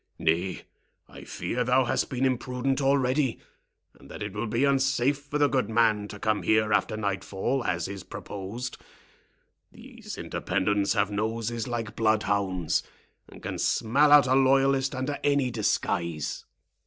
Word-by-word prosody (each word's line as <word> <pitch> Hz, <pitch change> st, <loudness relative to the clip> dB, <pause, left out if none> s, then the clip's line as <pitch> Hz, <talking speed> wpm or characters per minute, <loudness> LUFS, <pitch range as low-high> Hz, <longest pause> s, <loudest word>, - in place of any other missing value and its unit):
"Nay, 90 Hz, +2 st, 0 dB, 0.4 s
I -, -, -12 dB
fear 125 Hz, +1 st, -2 dB
thou 125 Hz, +2 st, +3 dB
hast -, -, 0 dB
been 130 Hz, 0 st, -1 dB
imprudent 130 Hz, +1 st, -1 dB
already, 135 Hz, -1 st, +1 dB, 0.6 s
and 70 Hz, -, -16 dB
that -, -, -7 dB
it 105 Hz, -1 st, -5 dB
will 105 Hz, +2 st, -3 dB
be 115 Hz, +5 st, +1 dB
unsafe 135 Hz, 0 st, +2 dB
for 145 Hz, +1 st, -4 dB
the 145 Hz, -1 st, +4 dB
good 135 Hz, -3 st, 0 dB
man 110 Hz, -2 st, +2 dB
to 105 Hz, -, -9 dB
come 110 Hz, 0 st, 0 dB
here 110 Hz, -1 st, +2 dB
after 105 Hz, +2 st, +1 dB
nightfall, 100 Hz, +5 st, -2 dB
as 85 Hz, -4 st, -1 dB
is 100 Hz, 0 st, -6 dB
proposed. 105 Hz, +8 st, -7 dB, 0.9 s
These -, -, -10 dB
Independents 100 Hz, +2 st, 0 dB
have 105 Hz, -2 st, +1 dB
noses 115 Hz, +3 st, -2 dB
like 115 Hz, -3 st, -4 dB
bloodhounds, 100 Hz, -6 st, +1 dB, 0.5 s
and -, -, -14 dB
can -, -, -4 dB
smell 140 Hz, +7 st, +2 dB
out 145 Hz, -1 st, +8 dB
a 130 Hz, -, +2 dB
loyalist 135 Hz, 0 st, +3 dB
under 130 Hz, +3 st, -3 dB
any 140 Hz, -3 st, +2 dB
disguise." 85 Hz, -, -1 dB
115 Hz, 145 wpm, -27 LUFS, 105-135 Hz, 0.9 s, out